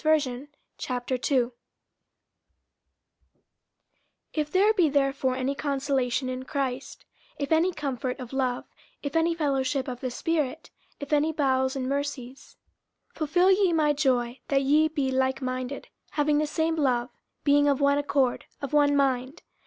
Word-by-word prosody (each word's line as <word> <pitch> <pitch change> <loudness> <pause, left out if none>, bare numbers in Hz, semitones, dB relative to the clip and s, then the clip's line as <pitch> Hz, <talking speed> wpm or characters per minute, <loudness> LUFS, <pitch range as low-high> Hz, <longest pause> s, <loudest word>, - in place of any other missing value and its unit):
50:002:001 255 -3 -1 2.8
If 300 -1 -2
there 405 +4 +4
be 355 -7 +3
therefore 275 -2 +1
any 260 +2 -1
consolation 275 -3 -1
in 255 0 -4
Christ, 265 -1 -4 0.3
if 280 - -4
any 325 +3 +4
comfort 270 -5 -3
of 250 0 -8
love, 255 -2 -1 0.4
if 285 0 -4
any 330 +1 +2
fellowship 275 -3 0
of 250 -2 -5
the 255 - -3
Spirit, 310 +2 -2 0.3
if 285 +1 -5
any 300 +2 +3
bowels 265 -3 +1
and 260 -1 -2
mercies, 275 -2 -4 0.5
50:002:002 - - -22
Fulfil 355 +5 +3
ye 380 -2 +3
my 305 -2 +3
joy, 255 -4 0
that 275 -1 +2
ye 300 +3 +4
be 285 -4 -1
likeminded, 260 0 -2 0.3
having 295 0 +2
the 305 - 0
same 320 +2 0
love, 250 -4 +1 0.3
being 290 0 +4
of 280 -2 +2
one 280 0 +3
accord, 275 -3 0
of 280 -1 -6
one 290 -1 +4
mind. 265 +1 0
280 Hz, 135 wpm, -27 LUFS, 260-300 Hz, 2.8 s, there